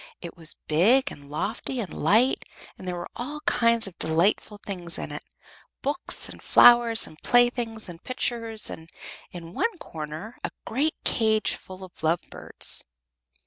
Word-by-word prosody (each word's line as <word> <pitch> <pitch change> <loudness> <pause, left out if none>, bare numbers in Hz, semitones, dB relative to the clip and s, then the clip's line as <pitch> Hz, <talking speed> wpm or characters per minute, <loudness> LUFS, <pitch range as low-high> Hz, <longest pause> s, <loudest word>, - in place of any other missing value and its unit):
It 170 - -8
was 165 -1 -4
big 215 +13 +4
and 140 0 -12
lofty 220 - -3
and 195 -8 -4
light, 220 - +3 0.3
and 185 - -10
there 180 - -2
were 175 0 -6
all 290 +5 -5
kinds 230 -4 +3
of 190 -3 -7
delightful 180 +6 +1
things 175 -4 -5
in - - -5
it 150 - -6 0.6
books 290 +6 -1
and - - -12
flowers 240 -2 +6
and 155 - -15
playthings 240 -2 +2
and 170 -1 -11
pictures, 230 -3 -1
and 160 0 -9 0.4
in 170 -1 -9
one 455 - 0
corner 160 - -7
a - - -1 0.2
great 290 +7 0
cage 220 -2 +2
full 185 0 -9
of 185 -1 -11
lovebirds. 165 +2 0
210 Hz, 150 wpm, -26 LUFS, 170-240 Hz, 0.6 s, flowers